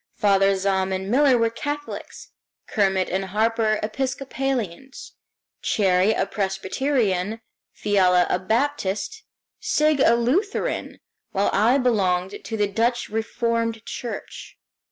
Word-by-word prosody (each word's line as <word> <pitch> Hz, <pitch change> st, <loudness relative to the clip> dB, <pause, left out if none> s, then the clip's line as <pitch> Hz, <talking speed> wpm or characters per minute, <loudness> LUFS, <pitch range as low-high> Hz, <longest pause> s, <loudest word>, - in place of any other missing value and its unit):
Father 195 Hz, -1 st, +3 dB
Zahm 190 Hz, 0 st, 0 dB
and 190 Hz, +1 st, -3 dB
Miller 265 Hz, 0 st, +5 dB
were 230 Hz, -1 st, +1 dB
Catholics, 290 Hz, +5 st, -6 dB, 0.3 s
Kermit 190 Hz, -3 st, +1 dB
and 190 Hz, +1 st, -2 dB
Harper 215 Hz, +2 st, +1 dB
Episcopalians, 265 Hz, -1 st, -3 dB, 0.5 s
Cherrie 190 Hz, +1 st, +2 dB
a -, -, +1 dB
Presbyterian, 200 Hz, +1 st, -1 dB, 0.3 s
Fiala 185 Hz, -3 st, +3 dB
a 180 Hz, -, 0 dB
Baptist, 225 Hz, -, -1 dB, 0.4 s
Sigg 305 Hz, -1 st, +2 dB
a 235 Hz, -3 st, +5 dB
Lutheran, 295 Hz, -, -1 dB, 0.4 s
while 200 Hz, 0 st, +1 dB
I 230 Hz, +6 st, +4 dB
belonged 195 Hz, -7 st, 0 dB
to 225 Hz, -, -4 dB
the 205 Hz, -1 st, +2 dB
Dutch 230 Hz, +4 st, 0 dB
Reformed 230 Hz, +1 st, -2 dB
Church. 240 Hz, -, -7 dB
220 Hz, 110 wpm, -23 LUFS, 195-250 Hz, 0.5 s, Miller